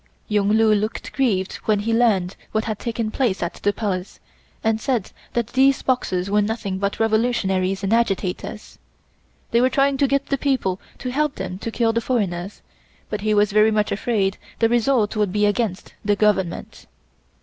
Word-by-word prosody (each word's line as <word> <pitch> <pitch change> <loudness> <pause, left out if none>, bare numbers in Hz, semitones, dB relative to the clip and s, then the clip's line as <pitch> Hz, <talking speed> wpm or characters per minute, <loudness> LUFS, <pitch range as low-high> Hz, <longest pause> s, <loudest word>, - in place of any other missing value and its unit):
Yung 205 -1 +1
Lu 220 -1 +5
looked 210 +1 -2
grieved 205 -9 0
when 210 -2 +2
he 225 +2 -1
learned 205 -6 +2 0.2
what 220 0 0
had 215 -2 -3
taken 230 -2 -2
place 225 -9 0
at 170 - -2
the 205 - +2
Palace, 195 -3 -4 0.4
and 220 0 +1
said 240 -7 -1 0.2
that 235 -1 -1
these 270 +1 +4
Boxers 190 -8 0
were 205 +1 +2
nothing 205 -3 -2
but 200 0 -2
revolutionaries 205 -4 +1
and 195 +3 +1
agitators. 210 -2 -2 0.7
They 235 - +4
were 255 - +4
trying 275 0 +2
to 280 - +3
get 275 +1 +1
the 275 - -1
people 245 -10 0 0.2
to 255 - -4
help 300 +2 0
them 185 - -5
to 230 - -4
kill 225 0 +1
the 230 - +1
foreigners, 200 -6 -2 0.5
but 210 - -2
he 215 0 +1
was 205 0 +3
very 215 +1 +5
much 210 -1 +1
afraid 200 -2 0 0.2
the 225 - +3
result 235 -2 +2
would 210 -3 +1
be 210 +1 +2
against 205 -2 -1
the 205 0 +2
Government. 200 -4 -1
215 Hz, 180 wpm, -22 LUFS, 200-235 Hz, 0.7 s, Lu